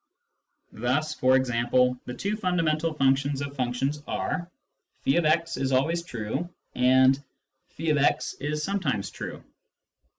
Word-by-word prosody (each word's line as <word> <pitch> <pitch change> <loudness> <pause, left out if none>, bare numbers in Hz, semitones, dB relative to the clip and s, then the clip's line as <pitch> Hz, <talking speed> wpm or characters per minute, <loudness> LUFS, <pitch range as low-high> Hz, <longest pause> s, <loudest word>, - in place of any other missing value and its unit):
Thus, 140 +7 0
for 130 -3 +3
example, 125 0 +2
the 125 - -6
two 205 +2 -2
fundamental 165 -5 0
functions 135 0 +2
of 140 0 -5
functions 135 +3 -1
are: 175 -1 -2 0.3
" - - -41
<f>x 165 +3 +2
is 135 0 -1
always 160 +6 +2
true 135 +2 -4
" - - -48
and 130 +2 +4 0.3
" 130 - -37
<f>x 150 -3 +1
is 150 +2 -2
sometimes 145 - -1
true." - - -7
140 Hz, 130 wpm, -26 LUFS, 130-160 Hz, 0.3 s, and